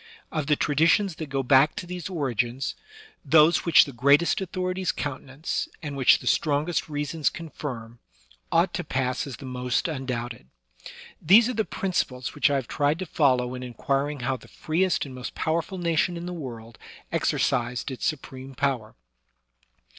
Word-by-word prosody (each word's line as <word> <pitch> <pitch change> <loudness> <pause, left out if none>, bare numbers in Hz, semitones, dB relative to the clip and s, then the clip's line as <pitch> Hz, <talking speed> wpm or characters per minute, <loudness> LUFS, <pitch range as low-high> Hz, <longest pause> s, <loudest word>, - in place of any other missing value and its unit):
Of 155 -3 -2
the 150 - +4
tradi 150 +3 +2
tions 195 -2 +2
that 155 -3 -6
go 135 -1 -1
back 135 +4 +5
to - - -5
these 180 0 -6
origins, 130 - -1 0.5
those 160 +1 +5
which 170 - +7
the 140 - -9
greatest 140 +10 +3
authorities 185 0 -2
countenance, 140 +1 -4
and 145 -2 -4
which 135 -2 +5
the - - -12
strongest 155 +3 +1
reasons 150 +1 -1
confirm, 125 -8 -7 0.5
ought - - +3
to - - -2
pass 130 +1 -1
as 130 -5 -7
the - - -10
most 125 +1 -1
undoubted. 125 - -4 0.7
These 220 +9 +6
are - - -1
the 220 -2 0
principles 130 -9 -2
which 145 - +3
I 140 - +1
have 130 -4 -2
tried 145 +1 +1
to 185 - -4
follow 130 -6 +2
in 125 - -6
inquiring 135 +3 -2
how 130 +2 -1
the - - -16
freest 175 +2 0
and 135 - -9
most 125 -1 -7
powerful 165 +4 -1
nation 170 0 +1
in 170 - -6
the 180 - -4
world 115 -8 -8 0.3
exercised 120 +3 0
its 130 - -7
supreme 135 -3 -4
power. 130 -5 -1
145 Hz, 165 wpm, -26 LUFS, 130-165 Hz, 0.7 s, which